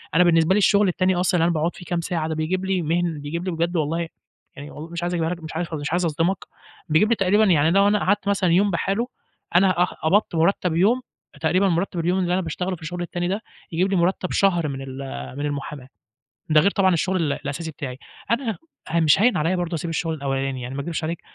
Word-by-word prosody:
أنا 180 Hz, -, +6 dB
بالنسبة 165 Hz, 0 st, +4 dB
لي -, -, +3 dB
الشُغل 205 Hz, 0 st, +4 dB
التاني 185 Hz, +1 st, +1 dB
أصلًا 180 Hz, 0 st, +1 dB
اللي 165 Hz, -, +3 dB
أنا 170 Hz, -, +2 dB
باقعُد 165 Hz, +2 st, -1 dB
فيه 180 Hz, -, -11 dB
كام 175 Hz, 0 st, -1 dB
ساعة 165 Hz, -2 st, -2 dB
بيجيب 180 Hz, +5 st, -1 dB
لي 190 Hz, -1 st, 0 dB
مهن 165 Hz, 0 st, -1 dB
بيجيب 165 Hz, +5 st, -4 dB
لي 185 Hz, -, -1 dB
بجد 170 Hz, +1 st, -1 dB
والله 165 Hz, +2 st, -1 dB, 0.5 s
يعني 145 Hz, +1 st, -9 dB
و 155 Hz, +2 st, -8 dB
مش 170 Hz, 0 st, -5 dB
عايز 175 Hz, +1 st, -1 dB
أجيبها 165 Hz, -2 st, 0 dB
لك 175 Hz, -1 st, -5 dB
مش 160 Hz, -, -8 dB
عارف 170 Hz, 0 st, -3 dB
مش 150 Hz, -1 st, -3 dB
عايز 175 Hz, +1 st, +1 dB
أصدمك، 165 Hz, +4 st, 0 dB, 0.5 s
بيجيب 160 Hz, +8 st, +4 dB
لي 235 Hz, -, +4 dB
تقريبًا 200 Hz, +2 st, +3 dB
يعني 160 Hz, -5 st, +4 dB
لو 200 Hz, +2 st, +4 dB
أنا 210 Hz, 0 st, +3 dB
قعدت 205 Hz, +1 st, 0 dB
مثلًا 195 Hz, -3 st, +2 dB
يوم 195 Hz, +4 st, +3 dB
بحاله، 195 Hz, +7 st, -1 dB, 0.5 s
أنا 185 Hz, -1 st, +4 dB
أه -, -, +6 dB
قبضت 180 Hz, +3 st, 0 dB
مُرتَّب 170 Hz, 0 st, +1 dB
يوم، 215 Hz, +9 st, +3 dB, 0.4 s
تقريبًا 185 Hz, +5 st, +2 dB
مُرتَّب 175 Hz, +1 st, -1 dB
اليوم 175 Hz, +3 st, +1 dB
اللي 180 Hz, -1 st, 0 dB
أنا 185 Hz, -, +1 dB
باشتغله 180 Hz, +2 st, -3 dB
في -, -, -18 dB
الشُغل 175 Hz, +3 st, -5 dB
التاني 175 Hz, 0 st, -3 dB
ده، 200 Hz, +4 st, -2 dB, 0.3 s
يجيب 180 Hz, +4 st, +1 dB
لي -, -, +2 dB
مُرتَّب 180 Hz, +1 st, 0 dB
شهر 175 Hz, -5 st, +2 dB
من 135 Hz, -2 st, -5 dB
ال 130 Hz, -1 st, -7 dB, 0.4 s
من 145 Hz, -, -2 dB
المُحاماة، 140 Hz, -2 st, -5 dB, 0.6 s
ده 155 Hz, -1 st, +6 dB
غير 200 Hz, -, +3 dB
طبعًا 190 Hz, -2 st, +3 dB
الشُغل 185 Hz, +3 st, 0 dB
ال 155 Hz, -5 st, 0 dB
الأساسي 160 Hz, +3 st, -5 dB
بتاعي. 135 Hz, -4 st, -7 dB, 0.3 s
أنا 235 Hz, -2 st, 0 dB, 0.3 s
فمش 160 Hz, -1 st, +3 dB
هاين 245 Hz, +2 st, +4 dB
عليّا 165 Hz, +4 st, +1 dB
برضه 175 Hz, -1 st, -2 dB
أسيب 170 Hz, +1 st, -4 dB
الشُغل 165 Hz, 0 st, -1 dB
الأولاني. 135 Hz, -3 st, -2 dB
يعني 125 Hz, +2 st, -6 dB
ما 140 Hz, -, -2 dB
أكدبش 165 Hz, +2 st, -4 dB
عليك، 165 Hz, +1 st, -3 dB
170 Hz, 230 wpm, -23 LUFS, 160-185 Hz, 0.6 s, أنا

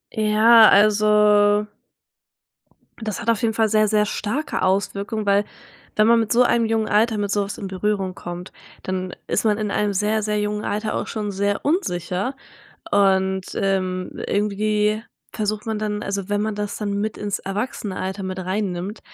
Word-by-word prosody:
Ja, 220 Hz, +1 st, +6 dB
also 210 Hz, 0 st, +4 dB, 1.4 s
das 215 Hz, -1 st, -4 dB
hat 230 Hz, -, -2 dB
auf 230 Hz, -2 st, +2 dB
jeden 225 Hz, -1 st, +1 dB
Fall 220 Hz, -1 st, +2 dB
sehr, 215 Hz, 0 st, +3 dB
sehr 210 Hz, 0 st, +2 dB
starke 225 Hz, +9 st, -3 dB
Auswirkungen, 200 Hz, +3 st, -1 dB
weil 200 Hz, +1 st, +3 dB, 0.5 s
wenn 215 Hz, 0 st, +4 dB
man 230 Hz, 0 st, +5 dB
mit 225 Hz, -2 st, -1 dB
so 245 Hz, +1 st, +5 dB
einem 235 Hz, -1 st, +2 dB
jungen 220 Hz, -1 st, 0 dB
Alter 220 Hz, +1 st, +2 dB
mit 205 Hz, -1 st, -2 dB
so 205 Hz, 0 st, +1 dB
was 200 Hz, -, -6 dB
in 200 Hz, -, -5 dB
Berührung 190 Hz, 0 st, -2 dB
kommt, 175 Hz, +1 st, -7 dB, 0.3 s
dann 185 Hz, -1 st, -4 dB
ist -, -, 0 dB
man 210 Hz, -1 st, +3 dB
in 210 Hz, -2 st, -2 dB
einem 205 Hz, 0 st, 0 dB
sehr, 210 Hz, +2 st, 0 dB
sehr 210 Hz, 0 st, 0 dB
jungen 210 Hz, 0 st, -2 dB
Alter 215 Hz, +1 st, -2 dB
auch -, -, -3 dB
schon 210 Hz, -2 st, -3 dB
sehr 200 Hz, +1 st, -1 dB
unsicher 205 Hz, -, -1 dB, 0.6 s
und, 190 Hz, -1 st, +3 dB
ähm, 185 Hz, -2 st, -1 dB, 0.2 s
irgendwie 210 Hz, +1 st, 0 dB, 0.3 s
versucht 215 Hz, -1 st, -2 dB
man 220 Hz, -2 st, -2 dB
dann 210 Hz, -1 st, -3 dB
also, 200 Hz, -1 st, -4 dB
wenn 205 Hz, 0 st, 0 dB
man 215 Hz, 0 st, -2 dB
das 205 Hz, 0 st, -4 dB
dann 205 Hz, -2 st, -3 dB
mit 215 Hz, +1 st, -3 dB
ins 205 Hz, -1 st, -3 dB
Erwachsenenalter 195 Hz, -2 st, -4 dB
mit 185 Hz, 0 st, -4 dB
rein 185 Hz, +1 st, -2 dB
nimmt, 185 Hz, +5 st, -5 dB
210 Hz, 170 wpm, -22 LUFS, 195-215 Hz, 1.4 s, Ja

